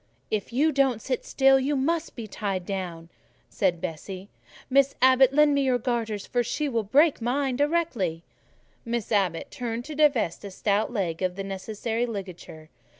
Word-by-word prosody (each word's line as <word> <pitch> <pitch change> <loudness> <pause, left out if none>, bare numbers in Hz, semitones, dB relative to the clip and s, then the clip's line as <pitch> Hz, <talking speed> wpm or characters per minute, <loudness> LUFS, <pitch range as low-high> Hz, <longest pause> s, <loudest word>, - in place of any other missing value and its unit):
"If 215 +1 -2
you 295 +6 +2
don't 270 -5 +2
sit 255 +2 -3
still, 270 0 +4
you 280 +2 0
must 320 +5 -1
be 230 - -6
tied 195 -3 -3
down," 175 -4 -5 0.4
said 180 -4 +1
Bessie. 185 +3 -6 0.4
"Miss 275 +1 +3
Abbot, 260 0 +6
lend 295 +1 +4
me 280 - +2
your 260 -2 +2
garters; 225 -4 -2
she 285 +5 -2
would 225 -6 -2
break 295 +2 +4
mine 260 +2 0
directly." 265 - 0 0.6
Miss 235 -1 -3
Abbot 190 -6 0
turned 240 -2 -4
to 310 - -7
divest 285 - +2
a 200 - -6
stout 205 +4 0
leg 185 -8 -2
of 185 -1 -1
the 195 - -4
necessary 220 +4 -3
ligature. 180 -7 -8
230 Hz, 160 wpm, -26 LUFS, 195-270 Hz, 0.6 s, Abbot